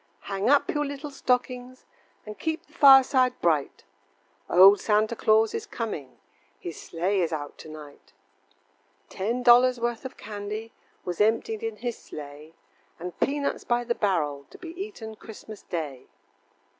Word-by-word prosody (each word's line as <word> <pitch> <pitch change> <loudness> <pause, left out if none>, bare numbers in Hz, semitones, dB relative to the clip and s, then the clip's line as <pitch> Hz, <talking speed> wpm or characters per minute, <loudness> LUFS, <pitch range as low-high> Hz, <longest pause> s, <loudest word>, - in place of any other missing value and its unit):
Hang 195 +3 -2
up 285 0 +3
your 295 -1 0
little 285 +1 -6
stockings, 250 -1 -2 0.4
And 210 -1 -9
keep 320 0 -3
the 300 - -26
fireside 270 -4 +6
bright, 155 -5 0 0.7
Old 195 +3 +8
Santa 215 +2 +1
Claus 220 0 +3
is 445 -1 -4
coming, 210 - -5 0.4
His 170 - -7
sleigh 185 +4 -1
is 170 - 0
out 145 -2 -5
to - - -10
night. 150 -2 -12 1.0
Ten 235 +6 -2
dollars 245 +1 +6
worth 235 -1 -2
of 260 - -8
candy 210 +2 -6 0.3
Was 180 +1 -2
emptied 230 - +1
in 450 -1 -3
his 240 -2 -5
sleigh, 150 +2 -10 0.4
And 180 +1 -7
peanuts 280 0 -1
by 240 0 0
the 235 0 0
barrel, 150 -10 -1
To - - -13
be 350 - -9
eaten 335 - -7
Christmas 215 -1 -11
day. 150 -7 -5
220 Hz, 145 wpm, -26 LUFS, 175-255 Hz, 1.0 s, Old